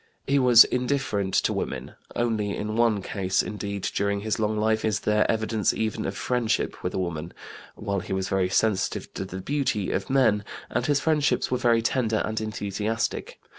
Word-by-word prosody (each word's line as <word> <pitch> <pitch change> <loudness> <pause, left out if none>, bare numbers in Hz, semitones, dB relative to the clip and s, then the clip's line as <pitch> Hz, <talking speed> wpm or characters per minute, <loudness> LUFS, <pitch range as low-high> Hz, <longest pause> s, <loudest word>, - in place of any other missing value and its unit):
He 140 +1 +2
was 125 -3 +9
indifferent 125 -7 -1
to - - +2
women; - - -4 0.2
only 110 -4 0
in 105 +1 -3
one 115 -4 +2
case, 95 -2 0
indeed, 100 -2 -5
during 100 0 0
his 110 +1 -2
long 110 0 0
life 110 +1 +1
is 110 -1 0
there 105 0 +2
evidence 110 -2 +1
even 110 -1 -2
of 95 - -4
friendship 125 -3 -1
with - - -3
a - - -1
woman, 85 -2 -3 0.4
while 100 -2 -2
he - - -8
was 95 0 -1
very 95 -2 +1
sensitive 105 0 0
to - - -4
the 95 0 -7
beauty 130 -5 -1
of 95 - -2
men, 120 -6 +3 0.3
and 120 +1 0
his 145 -1 +3
friendships 150 -2 +1
were 125 - +1
very 115 -1 +3
tender 115 -2 +1
and 110 0 -2
enthusiastic. 110 +1 -3
110 Hz, 180 wpm, -26 LUFS, 100-120 Hz, 0.4 s, was